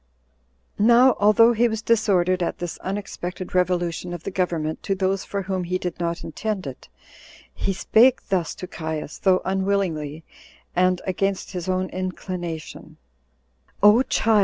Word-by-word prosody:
Now 240 +4 +6
although 215 +3 +6
he 235 +1 +3
was 220 -1 -3
disordered 190 -6 +2
at 170 - -1
this 175 -1 -5
unexpected 185 -2 -5
revolution 180 -1 0
of 170 -2 -7
the - - -4
government 165 -4 -1
to 195 - -1
those 190 0 0
for 200 -1 -4
whom 185 -1 -2
he 180 +1 -1
did 180 -2 -5
not 170 -1 -2
intend 215 -5 -4
it, 130 - -9 0.6
he - - -2
spake 235 +7 +3
thus 185 -4 0
to - - -7
Caius, 160 -3 -5
though 185 -1 +3
unwillingly, 190 -6 -1 0.5
and 185 0 +2
against 195 +1 -1
his 180 -1 -5
own 185 0 0
inclination: 180 -3 -6 0.9
"O 210 +4 +7
child! 225 -5 +2
185 Hz, 145 wpm, -23 LUFS, 175-205 Hz, 0.9 s, O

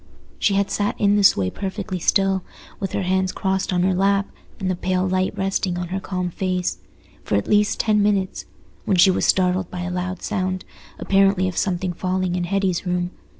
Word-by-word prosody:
She 200 - +2
had 200 0 +1
sat 205 0 -1
in 205 0 +3
this 205 -2 +5
way 95 -2 0
perfectly 190 -1 -4
still, 195 +2 +2 0.4
with 195 - -4
her - - -1
hands 185 0 +1
crossed 190 0 -1
on 180 -1 +1
her 190 0 +2
lap 195 +2 +2 0.3
and 190 - -2
the 185 - 0
pale 185 +1 0
light 185 0 +1
resting 190 -2 -1
on 175 -1 -4
her 190 +1 -2
calm 180 -2 -3
face, 180 - -2 0.4
for - - -1
at 100 - 0
least 210 0 +2
ten 210 -1 +3
minutes 200 -2 0 0.4
when 190 - +2
she 190 +2 +7
was - - 0
startled 185 -1 +2
by 180 - -5
a 180 0 -3
loud 180 0 -4
sound, 185 -3 -2 0.3
apparently 195 -1 +3
of 185 - -4
something 180 -1 -1
falling 185 0 -1
in 180 -1 -1
Hetty's 190 -1 0
room. 180 -1 -1
185 Hz, 195 wpm, -22 LUFS, 180-195 Hz, 0.4 s, she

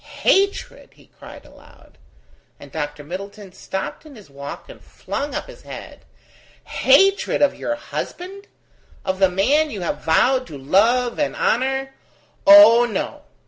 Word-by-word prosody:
"Hatred?" 395 +1 0
he - - -23
cried - - -13
aloud, - - -20 0.6
and 145 - -14
Dr. 145 -1 -5
Middleton 195 +5 -9
stopped 190 +1 -6
in 305 -3 -14
his 205 -10 -16
walk 140 +1 -9
and - - -14
flung 285 +1 -6
up - - -4
his - - -14
head: - - -11 0.6
"Hatred 385 +6 +2
of 285 - +3
your 295 - -4
husband? 380 +6 -7 0.6
of 190 0 -2
the 190 -1 +4
man 275 +12 +1
you 205 -8 -7
have 175 - -4
vowed 255 +11 +2
to 145 - -9
love 230 - +1
and 295 - -1
honour? 270 +3 -1 0.5
Oh, 300 -6 +8
no! 235 - -5
240 Hz, 140 wpm, -20 LUFS, 185-290 Hz, 0.6 s, Oh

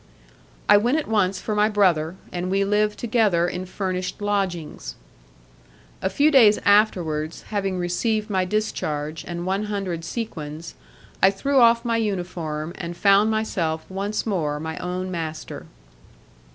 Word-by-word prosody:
I 205 - +7
went 240 +8 +2
at 315 - -2
once 200 -4 +1
for 215 - -3
my 210 +1 +3
brother, 180 -6 +2 0.2
and 180 +1 -3
we 195 +1 +1
lived 210 +1 +1
together 215 -8 +2
in 185 +1 -4
furnished 185 -1 -3
lodgings. 190 - -2 1.1
A - - 0
few 295 +8 +3
days 225 -7 +6
afterwards, 170 -7 +2
having 195 -3 -1
received 210 +5 -1
my 190 -4 +1
discharge 160 -6 -2
and 175 0 -4
one 195 +3 -1
hundred 195 -5 -3
sequins, 165 -6 -6 0.5
I 190 - +7
threw 270 +8 +1
off 235 0 +5
my 230 -1 +1
uniform, 175 -7 -3
and 175 -1 -5
found 200 +1 +5
myself 175 -8 -1
once 200 +3 -3
more 155 -9 -1
my 160 +1 -5
own 185 +1 -4
master. 160 -3 -5
190 Hz, 140 wpm, -23 LUFS, 170-210 Hz, 1.1 s, I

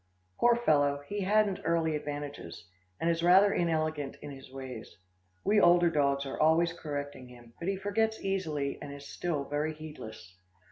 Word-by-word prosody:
Poor 240 0 +5
fellow, 145 -10 +2
he 205 - -3
hadn't 205 0 +2
early 165 -2 +1
advantages, 145 - -6 0.3
and 165 - -1
is 170 0 +1
rather 190 +4 +6
inelegant 155 -4 -1
in 145 - -7
his 135 -1 -11
ways. 130 -4 -8 0.5
We 205 +1 +4
older 175 0 +5
dogs 140 -2 +1
are 135 - -5
always 165 +2 +4
correcting 145 -5 -6
him, 120 -1 -15
but 170 - -5
he 195 - +1
forgets 220 +3 0
easily 160 -8 -2
and 145 - -7
is 140 0 -9
still 155 -3 -2
very 150 +2 -2
heedless. 110 - -10
155 Hz, 160 wpm, -30 LUFS, 140-175 Hz, 0.5 s, rather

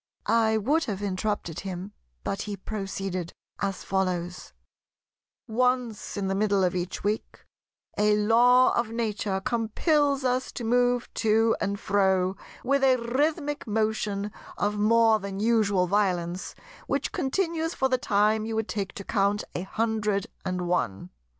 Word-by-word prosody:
I 220 0 +3
would 290 +10 +1
have 205 -2 -4
interrupted 190 -4 -2
him; 190 +1 -6 0.3
but 195 - -2
he 205 -1 -5
proceeded 195 -3 -4 0.3
as 195 -1 -2
follows: 180 - -2 1.0
"Once 250 -2 0
in 200 - -1
the 190 - 0
middle 200 -1 +2
of 180 - +2
each 180 0 -3
week 210 +2 -3 0.5
a 210 0 +4
Law 240 +4 +5
of 235 -2 0
Nature 215 -4 -2
compels 275 - +1
us 255 0 0
to 240 - -5
move 245 +1 +2
to 225 +1 +3
and 200 0 -1
fro 190 -2 +2 0.3
with 275 +1 +1
a 260 -1 +6
rhythmic 290 +5 -1
motion 210 -1 -1 0.3
of 205 +1 0
more 220 +1 +4
than 195 -1 -5
usual 210 -4 +3
violence, 180 -2 -1 0.3
which - - -1
continues 325 +3 -1
for 265 - +2
the 255 -1 +1
time 215 -1 +2
you 225 0 -3
would 220 0 -1
take 200 -3 -3
to 200 - -7
count 200 0 +1
a - - -3
hundred 210 0 -1 0.2
and 185 -1 -2
one. 100 - -1
210 Hz, 145 wpm, -27 LUFS, 195-235 Hz, 1.0 s, a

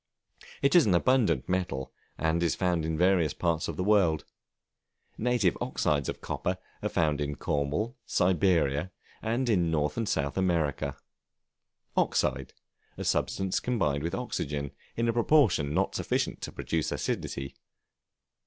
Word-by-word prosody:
It 140 - +4
is 175 -8 +6
an 90 - +4
abundant 105 - +2
metal, 90 -8 -2 0.2
and 80 +1 +1
is 85 - +1
found 90 -4 0
in 80 0 -1
various 90 -4 +3
parts 85 -2 0
of 85 - -5
the - - 0
world. 90 -7 +3 0.9
Native 115 -6 +1
oxides 70 -2 0
of - - -5
copper 90 +1 -2 0.2
are - - -1
found 75 -3 +1
in 75 0 -2
Cornwall, 75 - -1
Siberia, 90 -3 +2 0.3
and 120 +4 -1
in 90 -7 +2
North 75 +2 0
and 115 -2 -1
South 70 +6 -1
America. 75 -6 0 1.0
Oxide, 65 0 0 0.4
a - - -4
substance 95 -1 0
combined 85 - 0
with 85 +3 -2
Oxygen, 70 -1 -3 0.3
in 115 0 +1
a 115 - +2
proportion 115 - +3
not - - +1
sufficient - - -1
to - - -5
produce 80 -2 -2
acidity. 70 0 -3
85 Hz, 140 wpm, -29 LUFS, 75-100 Hz, 1.0 s, is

